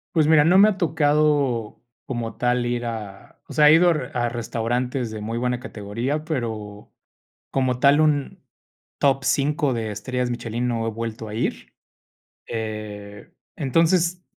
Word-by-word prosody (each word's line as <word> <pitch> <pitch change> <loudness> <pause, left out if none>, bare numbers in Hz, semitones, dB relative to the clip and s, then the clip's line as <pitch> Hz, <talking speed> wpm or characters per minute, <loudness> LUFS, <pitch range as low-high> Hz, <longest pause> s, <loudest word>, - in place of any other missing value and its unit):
Pues, 155 -2 +4
mira, 155 -2 +6
no 175 +4 +5
me 200 +2 +8
ha 210 -3 0
tocado 145 - +1 0.2
como 120 -4 -4
tal 125 0 0
ir 120 0 -2
a 105 -4 -7
o - - -9
sea, 150 -1 +6
he - - +8
ido 175 +2 +5
a 125 -5 -2
a - - 0
restaurantes 120 +2 -2
de 110 -1 -7
muy 115 +2 -4
buena 125 0 -1
categoría, 125 +6 -4
pero 110 -8 -5 0.6
como 130 -2 0
tal, 140 +3 +5
un 145 -3 0 0.6
top 135 -1 +2
5 145 +1 +1
de 110 -2 -3
estrellas 125 +4 -3
Michelin 120 0 -3
no 115 -2 -1
he - - -1
vuelto 115 0 -5
a - - -7
ir. 115 - -3 0.8
Eh, 105 -2 -6 0.2
entonces, 170 +5 +1
125 Hz, 155 wpm, -23 LUFS, 115-150 Hz, 0.8 s, me